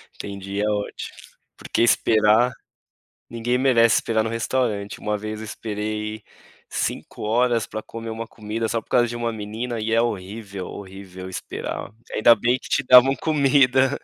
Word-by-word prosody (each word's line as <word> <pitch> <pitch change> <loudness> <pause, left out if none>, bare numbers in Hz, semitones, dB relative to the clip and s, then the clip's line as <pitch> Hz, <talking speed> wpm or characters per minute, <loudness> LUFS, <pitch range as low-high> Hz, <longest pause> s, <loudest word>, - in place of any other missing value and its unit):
Entendi. 100 0 -5
É 105 - +1
ótimo, 105 -1 -4 0.4
porque - - -2
esperar, 110 +1 +4 0.8
ninguém 120 +1 -1
merece 120 -3 +4
esperar 110 -1 +1
no 115 - -2
restaurante. 115 -3 -1
Uma 105 0 -1
vez 110 +1 -5
eu 110 - -6
esperei 105 0 -4 0.5
5 - - -4
horas 120 +1 +2
para 110 - -5
comer 115 0 -8
uma 115 0 -5
comida, 110 +1 -4
só 115 0 -1
por - - -33
causa 120 -1 +4
de 120 - -5
uma 120 -1 -1
menina 110 +3 -4
e 110 +1 -2
é 115 - +4
horrível, 100 -3 -4
horrível 95 -1 -9
esperar, 95 - -5 0.2
ainda 115 +2 +6
bem 120 +4 +2
que - - -11
te 145 - +1
davam 130 +2 +8
comida, 135 -2 +3
110 Hz, 160 wpm, -23 LUFS, 105-120 Hz, 0.8 s, davam